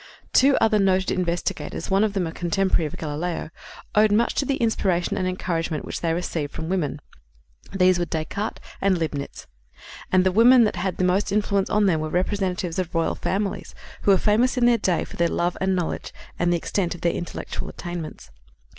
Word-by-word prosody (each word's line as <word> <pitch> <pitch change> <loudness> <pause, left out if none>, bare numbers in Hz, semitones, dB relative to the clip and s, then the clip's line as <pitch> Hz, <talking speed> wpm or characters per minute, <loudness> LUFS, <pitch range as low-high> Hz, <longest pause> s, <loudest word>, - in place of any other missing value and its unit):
Two 275 +1 +5
other 220 -1 +3
noted 190 -1 +2
investigators, 175 +1 -2
one 195 +2 +4
of 215 -2 0
them 190 -3 0
a 165 - -4
contemporary 175 0 0
of - - -8
Galileo, 160 +2 -4 0.4
owed 215 0 +4
much 225 +3 +2
to 280 - 0
the 275 - 0
inspiration 195 -7 0
and 185 - -1
encouragement 165 -4 -2
which - - -5
they 165 - 0
received 165 -3 -3
from 160 - -5
women. 170 -6 -1 0.7
These 185 -2 +3
were 175 - 0
Descartes 170 +6 -3 0.2
and 195 -2 +3
Leibnitz. 150 -4 -4 0.7
And 185 0 +4
the 185 - +2
women 235 +5 +7
that 210 -4 0
had 185 +1 -2
the - - 0
most 185 +3 +1
influence 200 -1 +1
on 210 -1 +3
them 170 -5 +2
were 155 0 -3
representatives 180 -1 -1
of 175 -2 -3
royal 165 0 +1
families, 195 -1 -3 0.3
who - - 0
were 195 - +7
famous 230 +7 +2
in 245 - +3
their 240 -1 +4
day 180 -4 +1
for - - -11
their 170 - +3
love 175 +1 0
and 190 0 +2
knowledge 175 -3 -3 0.3
and 175 0 +2
the 175 - +2
extent 175 +1 -2
of 175 - -12
their 170 - +1
intellectual 170 - -5
attainments. 165 - -7
185 Hz, 195 wpm, -24 LUFS, 170-200 Hz, 0.7 s, women